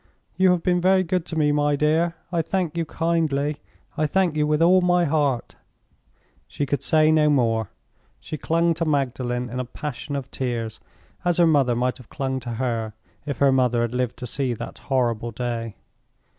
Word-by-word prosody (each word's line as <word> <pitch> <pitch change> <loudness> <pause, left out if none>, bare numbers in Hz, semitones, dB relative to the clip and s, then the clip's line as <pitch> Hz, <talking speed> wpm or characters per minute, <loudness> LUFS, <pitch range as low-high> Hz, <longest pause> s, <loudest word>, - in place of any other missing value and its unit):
"You 190 0 +4
have 180 -2 +2
been 180 -1 +2
very 185 +1 +4
good 180 -1 -1
to 165 - -5
me, 150 -2 +2
my 145 0 +2
dear; 160 +4 +1 0.2
I 170 -2 +1
thank 175 -2 -2
you 165 -1 -1
kindly; 155 -3 0 0.4
I 155 - +1
thank 180 0 +1
you 150 -1 +1
with 150 0 +1
all 180 +3 +5
my 180 -1 +3
heart." 145 -5 0 0.9
She 145 - -3
could 145 +1 -1
say 155 0 +3
no 155 -1 +4
more; 115 -6 +1 0.5
she - - -6
clung 165 +2 +1
to 165 +1 -2
Magdalen 125 -4 -1
in 125 +1 -5
a - - -1
passion 140 +2 -6
of 135 -2 -5
tears, 120 -4 -3 0.4
as 175 -1 +1
her 175 - +5
mother 140 -7 +3
might 125 +1 0
have 125 - -15
clung 135 -2 -2
to 120 -1 -6
her, 115 -3 -2 0.3
if 140 - -3
her 140 -1 +4
mother 125 -3 +2
had 120 0 -2
lived 125 -2 -1
to - - -6
see 125 0 -2
that - - -8
horrible 120 -4 0
day. 115 -1 -4
145 Hz, 190 wpm, -23 LUFS, 125-165 Hz, 0.9 s, all